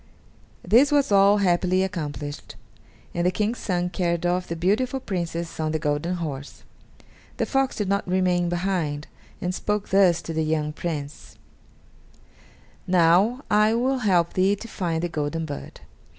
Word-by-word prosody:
This 250 +9 +5
was 285 -6 +2
all 200 +1 +6
happily 185 -1 +2
accomplished, 150 -6 -5 0.6
and 170 - -1
the 180 - +3
King's 215 +5 -1
son 180 -2 -1
carried 170 -1 -1
off 180 +1 0
the 170 - -3
beautiful 215 +10 0
Princess 170 -6 -4
on 155 0 -1
the - - +1
golden 150 +3 -1
horse. 145 -5 -6 0.7
The - - 0
fox 270 -1 0
did 210 - -2
not 200 0 0
remain 180 -1 +1
behind, 175 -5 -1 0.4
and 180 +1 -1
spoke 210 +2 -2
thus 185 -3 +4
to 165 - -5
the 160 0 0
young 155 -1 -1
Prince: 150 -3 -6 1.5
"Now 185 - +3
I 215 +2 +4
will 260 +3 +1
help 180 -7 +2
thee 190 +2 +3
to 230 - -10
find 170 -6 -2
the - - +1
golden 160 0 -3
bird. 145 -2 -8
180 Hz, 150 wpm, -24 LUFS, 165-200 Hz, 1.5 s, all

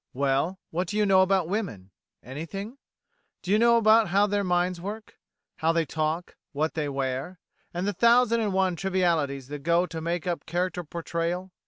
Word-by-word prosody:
Well, 140 +7 0
what 180 +3 -1
do 210 - -3
you 210 - +3
know 190 -1 +5
about 190 -2 +2
women? 170 - -4 0.3
Anything? 195 - -7 0.6
Do 185 - -3
you 210 - +4
know 235 0 +5
how 210 -2 +5
their 205 0 0
minds 180 -1 0
work? 210 +3 -7 0.4
how 160 +1 +2
they 165 -1 +1
talk? 155 +3 -2 0.2
what 155 +3 -1
they 150 -2 -2
wear? 135 +5 -3 0.3
and 175 +2 -3
the 205 - 0
thousand 235 +3 +4
and 210 -2 0
one 190 -1 +1
trivialities 170 -8 0
that 145 0 -5
go 170 +4 +2
to 165 -2 -6
make 170 +1 -2
up 175 -2 -3
character 180 +1 -2
portrayal? 170 +3 -3
175 Hz, 175 wpm, -26 LUFS, 160-195 Hz, 0.6 s, know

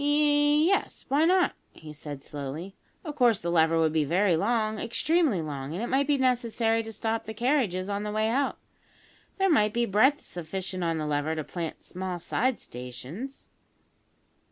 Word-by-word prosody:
"Ye 295 +1 +4
yes 390 +3 0
why 290 +4 +3
not?" 365 +1 +3 0.2
he 155 -1 -11
said 145 -2 -8
slowly. 150 +8 -6 0.3
"Of 305 - -4
course, 240 -6 +4
the 170 - -2
lever 165 -1 +3
would 160 -1 +3
be 160 -1 +2
very 180 +4 +2
long, 215 +3 0
extremely 250 - +1
long, 145 0 -5
and 200 - -3
it 240 - -3
might 275 +1 +2
be 290 -1 +3
necessary 235 -3 +1
to 225 0 -7
stop 225 +1 -2
the 220 - -7
carriages 230 -7 +1
on 200 0 -2
the 210 0 -3
way 215 +1 +1
out. 270 +5 0 0.8
There 390 0 +3
might 215 - +3
be 235 0 +1
breadth 255 +9 +3
sufficient 185 +2 -5
on 165 -1 0
the 155 - -2
lever 150 +1 -1
to 155 - -3
plant 165 +1 -5
small 185 -1 -5
side 250 +8 0
stations." 130 - -8
210 Hz, 180 wpm, -27 LUFS, 165-260 Hz, 0.8 s, Ye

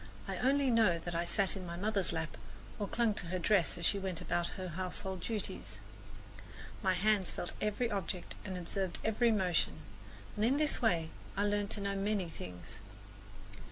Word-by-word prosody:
I - - -2
only 270 +1 +3
know 220 -7 +5
that 170 +1 -5
I 170 +1 0
sat 190 +3 +3
in 190 - -5
my 170 -1 -5
mother's 200 0 +1
lap 160 -1 -3 0.4
or 205 - -1
clung 230 0 +2
to 185 - -3
her 185 +2 -1
dress 180 -2 +3
as 170 - -1
she 200 - +4
went 190 -3 -2
about 175 0 0
her 185 -1 -4
household 185 +2 -3
duties. 215 +1 -3 1.0
My 190 -3 +3
hands 200 0 +3
felt 175 - -4
every 210 +3 0
object 190 -3 -3
and 190 -2 -4
observed 180 +1 -2
every 230 +2 +3
motion, 180 -6 +1 0.5
and 210 - 0
in 255 +5 +4
this 305 0 +1
way 170 -9 +2 0.3
I 200 - +3
learned 205 -1 +1
to - - -4
know 200 0 -1
many 195 -2 0
things. 90 - -8
195 Hz, 180 wpm, -34 LUFS, 175-210 Hz, 1.0 s, know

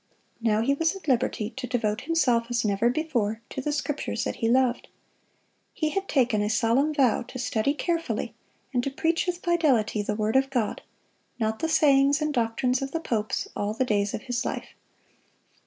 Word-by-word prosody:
Now 220 -1 +2
he 275 +4 +2
was 325 +5 +1
at 380 -5 -11
liberty 235 -4 0
to 260 -1 -6
devote 225 -2 -1
himself, 255 -8 +2
as 240 -1 0
never 210 +3 +2
before, 240 -7 -1
to 265 - -4
the 295 - -1
Scriptures 295 0 -2
that - - -3
he 225 - 0
loved. 250 0 +2 0.9
He 310 -2 0
had 390 +4 -2
taken 245 -7 +2
a 210 - 0
solemn 230 +7 +2
vow 270 -7 +3
to 255 - -8
study 245 +3 0
carefully 335 +2 -2 0.4
and 245 -1 +1
to 275 - -1
preach 330 +6 0
with 355 0 -3
fidelity 270 -12 +2
the 210 0 -2
word 215 +2 -1
of 270 0 +3
God, 245 -6 -1 0.6
not 220 -2 -1
the 325 - -1
sayings 285 -2 +4
and 305 -1 -1
doctrines 250 +2 0
of 270 0 -4
the 330 - 0
popes, 220 -8 -2
all 205 +1 -2
the 260 - +1
days 205 -3 0
of - - -7
his 245 -2 -2
life. - - -4
250 Hz, 190 wpm, -26 LUFS, 225-295 Hz, 0.9 s, sayings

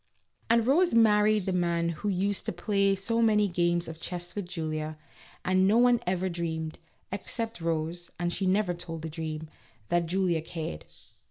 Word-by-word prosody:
And 230 0 +4
Rose 310 +3 +3
married 215 -2 +4
the 190 - 0
man 170 -1 +1
who 170 +5 -3
used 195 +1 -1
to - - +1
play 195 +2 +1
so 230 +4 0
many 210 -2 +4
games 175 -1 +1
of 160 0 -8
chess 175 -1 -5
with 200 -4 -4
Julia, 155 -3 -3 0.5
and 185 +1 +3
no 215 +3 +4
one 245 0 +5
ever 185 0 0
dreamed 160 -3 -3 0.3
(except 225 +2 -3
Rose, 165 +1 -2
and 175 0 -1
she 190 - -1
never 190 -1 +2
told 165 -2 -6
the 160 - -3
dream) 160 -1 -5 0.4
that 175 -1 +2
Julia 175 -2 +1
cared. 155 - -6
180 Hz, 170 wpm, -28 LUFS, 165-205 Hz, 0.5 s, one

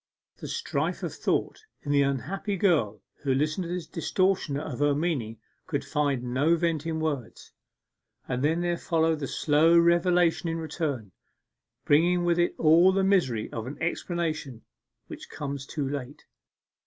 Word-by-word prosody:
The - - -8
strife 465 - -2
of - - -3
thought - - -1 0.2
in 145 - -3
the 140 0 +4
unhappy 155 - -2
girl 115 - +1 0.2
who 135 -2 +1
listened 155 +6 0
to - - -6
this 175 -1 -3
distortion 180 -2 0
of 135 -4 -6
her 145 -1 +3
meaning 140 -9 -2 0.3
could - - -2
find 140 -4 0
no 135 +7 +2
vent 165 -2 -1
in 160 -1 -2
words. 145 -7 -4 0.8
And 125 +1 -2
then 160 +3 +2
there 175 -1 -1
followed 160 -1 +1
the 140 - -3
slow 160 +5 +3
revelation 170 0 +3
in 165 - -2
return, 150 - -3 0.7
bringing 175 +4 +3
with 175 0 +2
it 175 - +1
all 165 +4 +6
the 195 0 +1
misery 165 - +1
of 115 +1 -5
an 140 +2 -7
explanation 165 -7 -3 0.4
which - - -10
comes 140 -2 -5
too 145 -3 -3
late. 140 0 -6
155 Hz, 155 wpm, -27 LUFS, 140-170 Hz, 0.8 s, all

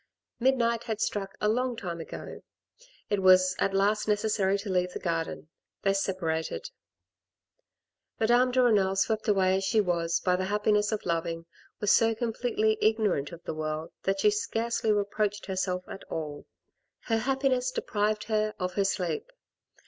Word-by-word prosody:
Midnight 235 -2 +2
had 220 -3 -3
struck 195 -3 -2
a 210 - +1
long 245 +3 +1
timo 175 -7 -5
ago; - - -8 0.7
it 205 -1 +1
was 185 0 +6
at 195 - +2
last 205 +3 +1
neces 210 +1 +1
sary 195 -1 +2
to 200 +2 -7
leave 180 -1 0
the - - -4
garden; 165 -2 -3 0.3
they 195 - +3
separated. 165 - -2 1.5
Madame 240 +3 +4
de 255 0 +3
Renal 200 -5 +3
swept 215 +3 0
away 190 -2 +3
as 195 - -2
she 205 +3 +2
was, 170 -3 +1
by 180 0 +1
the 185 +1 -1
happiness 210 +1 +1
of 215 - -3
loving, 165 -1 -2 0.3
was 210 - +2
so 225 0 +4
completely 225 -1 0
ignorant 210 -10 +1
of 170 0 -11
the - - -4
world 155 0 -4
that 195 0 0
she 210 - +5
scarcely 225 +1 -1
reproached 205 0 0
herself 185 -1 -2
at 195 - -8
all. 150 -2 -6 0.5
Her 225 - 0
happiness 265 0 +1
deprived 215 -3 -1
her 215 -1 0
of 180 -1 -3
her 200 - +1
sleep. 210 - -2
205 Hz, 160 wpm, -28 LUFS, 185-220 Hz, 1.5 s, was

